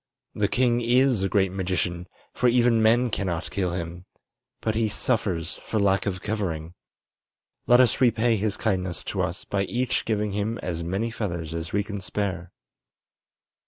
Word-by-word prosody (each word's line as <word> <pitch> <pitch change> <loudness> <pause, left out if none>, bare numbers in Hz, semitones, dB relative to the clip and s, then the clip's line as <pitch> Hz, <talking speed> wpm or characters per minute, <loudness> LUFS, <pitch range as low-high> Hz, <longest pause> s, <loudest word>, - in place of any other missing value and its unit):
The 105 -2 +1
king 120 +1 +2
is 125 -1 +3
a 95 - 0
great 95 -2 +2
magician, 90 -2 -2 0.3
for 125 - +3
even 120 -1 +4
men 115 +2 +4
cannot 90 -5 -2
kill 90 -3 -1
him. 85 0 -5 0.5
But 110 - -1
he 110 0 +1
suffers 95 -8 -1
for 110 - -1
lack 100 -1 +2
of 95 -2 -3
covering. 85 -7 -3 0.9
Let 120 0 +7
us 125 0 +3
repay 115 -1 +3
his 105 -1 -1
kindness 90 -6 -1
to - - 0
us - - -3
by 100 -1 -1
each 125 +4 -1
giving 105 -2 0
him 105 +3 -2
as 85 -2 -3
many 95 +7 -2
feathers 85 -8 -4
as 85 0 -4
we 100 +1 +1
can 100 -1 -6
spare." 95 -2 -3
100 Hz, 160 wpm, -25 LUFS, 90-115 Hz, 0.9 s, Let